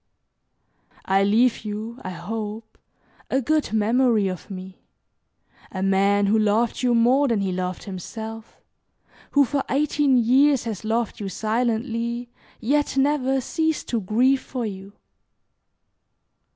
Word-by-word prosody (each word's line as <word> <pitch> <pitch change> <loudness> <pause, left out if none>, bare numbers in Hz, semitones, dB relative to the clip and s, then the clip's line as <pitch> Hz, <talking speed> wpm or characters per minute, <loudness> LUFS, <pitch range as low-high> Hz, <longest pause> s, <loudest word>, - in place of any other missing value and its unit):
I 195 +1 +3
leave 225 +4 +3
you, 215 +3 -6
I - - -4
hope, 215 +4 -6 0.5
a 265 - +2
good 305 +3 0
memory 220 0 +2
of 185 +2 -7
me 190 0 -9 0.9
a 190 0 -3
man 200 +1 +3
who 215 +2 +3
loved 215 +2 +1
you 245 -2 +2
more 255 +5 +4
than 230 -5 +1
he 195 -1 -1
loved 180 0 -3
himself, 220 +4 -8 0.7
who 285 -1 +5
for 280 +1 -1
eighteen 285 -1 +2
years 260 +3 +4
has 225 -4 -5
loved 225 +1 -1
you 200 -2 -4
silently, 235 +2 -2 0.3
yet 285 +4 0
never 270 -1 +2
ceased 320 +4 -1
to 230 -3 0
grieve 250 +7 +2
for 250 -3 -4
you. 195 -1 -7
225 Hz, 125 wpm, -23 LUFS, 205-255 Hz, 0.9 s, who